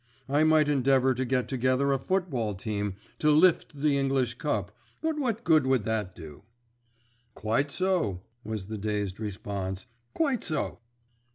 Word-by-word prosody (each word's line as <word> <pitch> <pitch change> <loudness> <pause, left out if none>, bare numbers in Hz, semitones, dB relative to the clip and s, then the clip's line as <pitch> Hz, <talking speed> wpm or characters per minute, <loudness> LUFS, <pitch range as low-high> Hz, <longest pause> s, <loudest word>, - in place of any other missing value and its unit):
I 145 +3 +3
might 155 -1 +4
endeavour 135 -2 +3
to 130 +1 -2
get 125 0 0
together 130 +1 +1
a 135 - 0
football 135 - -1
team 100 -1 -3 0.2
to 150 - +3
'lift' 155 0 +4
the 145 -2 +3
English 135 -3 +1
Cup; 105 -10 -2 0.2
but 320 -1 -1
what 235 -4 -1
good 155 - +4
would 130 -5 +2
that 105 -5 -2
do?" 80 -4 -11 0.9
"Quite 115 +8 0
so," 170 - 0 0.2
was 110 -3 -4
the 110 +1 -6
dazed 105 -2 -2
response, 100 -2 -4 0.3
"quite 280 -8 +1
so." 155 -6 -1
130 Hz, 150 wpm, -28 LUFS, 105-150 Hz, 0.9 s, might